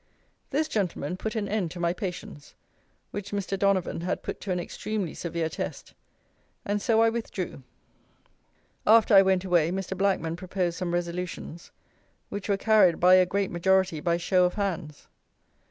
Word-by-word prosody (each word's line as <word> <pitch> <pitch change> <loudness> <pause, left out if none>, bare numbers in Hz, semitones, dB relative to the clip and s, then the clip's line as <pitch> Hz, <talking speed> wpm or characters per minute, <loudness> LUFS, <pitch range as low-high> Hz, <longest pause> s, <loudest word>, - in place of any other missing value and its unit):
This 310 +3 0
gentleman 180 - -2
put 220 +4 -4
an 210 -2 -1
end 200 -4 -1
to 175 - -9
my 170 0 +1
patience, 180 -6 -7 0.6
which 205 -1 -5
Mr. 200 -1 -2
Donavon 195 -3 +1
had 180 +2 -2
put - - -5
to 195 - -4
an 180 - 0
extremely 200 +1 -4
severe 170 -1 -3
test; 160 - -6 0.7
and 205 0 -1
so 225 -1 +3
I 225 - +5
withdrew. 205 -9 -5 1.3
After 220 0 +6
I 195 - +10
went 190 -1 +2
away 170 -3 +3
Mr. 190 +1 -3
Blackman 185 -4 0
proposed 180 -2 -2
some 180 -2 -2
resolutions, 175 -1 -5 0.6
which 200 0 -5
were 200 - +2
carried 210 -5 +4
by 180 +1 +6
a 185 -1 +6
great 200 +1 -1
majority 190 -1 +2
by 170 +2 +1
show 180 +1 +3
of 180 - -1
hands. 175 -7 -3
185 Hz, 160 wpm, -27 LUFS, 175-200 Hz, 1.3 s, I